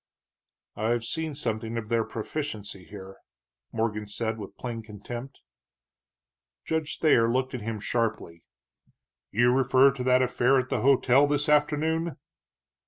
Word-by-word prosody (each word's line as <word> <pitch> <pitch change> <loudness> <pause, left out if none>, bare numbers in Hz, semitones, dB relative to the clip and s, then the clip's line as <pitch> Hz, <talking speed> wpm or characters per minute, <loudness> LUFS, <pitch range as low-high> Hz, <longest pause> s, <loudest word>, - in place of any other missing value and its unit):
"I've 115 +2 0
seen 160 +5 -3
something 115 -3 -3
of 110 -2 -5
their 115 -1 +2
proficiency 110 - -5
here," 95 -1 -10 0.5
Morgan 105 -2 -2
said, 110 +2 -3
with 100 - -9
plain 120 -2 -5
contempt. 120 - -9 1.2
Judge 160 -2 -2
Thayer 115 -7 +4
looked 130 +2 0
at 125 - -4
him 110 0 -4
sharply. 110 -7 -2 0.9
"You 120 +3 +3
refer 135 +1 +5
to 130 -1 -5
that 130 0 +4
affair 125 +1 +3
at 130 0 0
the - - -1
hotel 135 +1 +4
this 145 +1 +1
afternoon?" 150 +2 +1
120 Hz, 130 wpm, -27 LUFS, 110-140 Hz, 1.2 s, refer